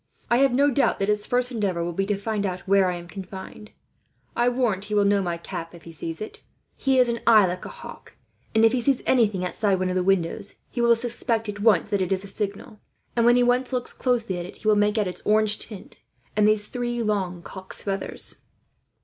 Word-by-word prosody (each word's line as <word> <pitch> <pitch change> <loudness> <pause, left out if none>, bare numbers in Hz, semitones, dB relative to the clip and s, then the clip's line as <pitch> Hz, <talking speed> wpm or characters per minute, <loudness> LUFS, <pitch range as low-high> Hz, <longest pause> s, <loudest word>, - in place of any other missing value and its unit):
"I 235 - +5
have 275 0 +4
no 280 +3 +3
doubt 275 +2 +2
that 195 +1 -1
his 210 0 0
first 250 0 +1
endeavour 195 -7 -1
will 175 0 -3
be 195 +3 -1
to 205 -1 0
find 210 0 -2
out 180 -1 -4
where 195 -1 +4
I 180 - -2
am 175 0 -9
confined. 195 +2 -9 0.7
I 240 +1 +3
warrant 235 -6 0
he 210 0 -3
will 205 -1 +4
know 200 0 +3
my 175 -2 -2
cap, 165 0 -7
if 170 - -14
he 165 - -10
sees 165 0 -5
it. 215 - -8 0.3
He 270 -1 +1
has 250 -1 +5
an 235 0 -1
eye 215 -3 +7
like 180 0 -4
a - - -6
hawk - - -11 0.4
and, 220 0 +6
if 225 - +5
he 255 0 0
sees 270 +1 +2
anything 210 -7 +2
outside 195 +1 0
one 185 0 -1
of 180 - -2
the 185 - +2
windows, 195 +2 0 0.2
he 240 - -2
will 235 0 +5
suspect 230 -1 -2
at 205 0 -5
once 205 -5 +3
that 200 -2 +1
it 185 - -1
is 190 0 0
a - - -8
signal; 210 +2 -5 0.4
and 235 -1 +3
when 240 - +6
he 245 - +4
once 250 +1 +2
looks 250 -1 -1
closely 235 -8 -1
at 175 - -5
it, - - -12
he 215 - -7
will 215 - +6
make 210 +1 +2
out 210 -3 +1
its 180 - -4
orange 215 0 +3
tint 210 -4 -8 0.4
and 210 0 +4
these 215 -1 +3
three 240 0 -3
long 190 -5 -2
cock's 190 +1 -6
feathers." 195 -1 -1
210 Hz, 240 wpm, -24 LUFS, 190-235 Hz, 0.7 s, eye